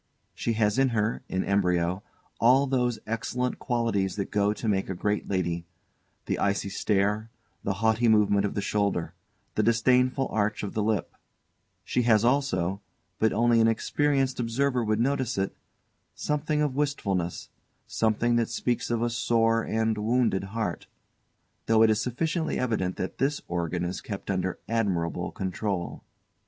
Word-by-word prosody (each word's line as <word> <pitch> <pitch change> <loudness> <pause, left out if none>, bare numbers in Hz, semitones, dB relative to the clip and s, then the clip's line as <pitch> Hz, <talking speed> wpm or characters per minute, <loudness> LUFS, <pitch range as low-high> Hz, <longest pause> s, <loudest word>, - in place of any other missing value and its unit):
She 115 - -1
has 105 +1 +1
in 135 -1 +4
her, 110 +2 0
in 95 - 0
embryo, 90 -2 +1 0.4
all 130 +4 +5
those 125 -3 0
excellent 125 +3 -2
qualities 115 -6 0
that 100 - -4
go 105 0 +2
to 110 +2 -4
make 95 -3 0
a 95 - -2
great 105 +3 -1
lady: 85 -3 -1 0.6
the - - -1
icy 100 0 0
stare, 105 +2 0 0.3
the 100 - 0
haughty 110 +2 +3
movement 105 -2 +4
of 100 - -2
the 100 - 0
shoulder, 100 -5 0 0.4
the - - +1
disdainful 125 +4 +3
arch 105 0 0
of 100 - -4
the 110 - 0
lip; 105 -2 -1 0.7
she 125 - 0
has 115 -2 +4
also, 100 -8 +1 0.4
but 110 - +3
only 120 +1 +3
an 115 - +5
experienced 135 +3 +1
observer 125 +2 0
would 110 0 0
notice 130 -1 0
it, 95 0 -1 0.6
something 150 0 0
of 145 -3 0
wistfulness, 100 - -1 0.4
something 115 +2 +1
that 115 -1 +1
speaks 120 -1 -1
of 120 -1 0
a 120 - +1
sore 115 -1 +2
and 110 -1 0
wounded 115 -3 +1
heart 110 +2 -4 0.8
though 110 0 +5
it 110 - +5
is 105 0 +1
sufficiently 160 +8 -1
evident 105 -7 -1
that 95 - -5
this 145 +2 +1
organ 85 0 -2
is 90 +1 -4
kept 100 -1 -5
under 95 -1 -1
admirable 90 -6 -1
control. 95 -1 -3
110 Hz, 155 wpm, -27 LUFS, 100-120 Hz, 0.8 s, all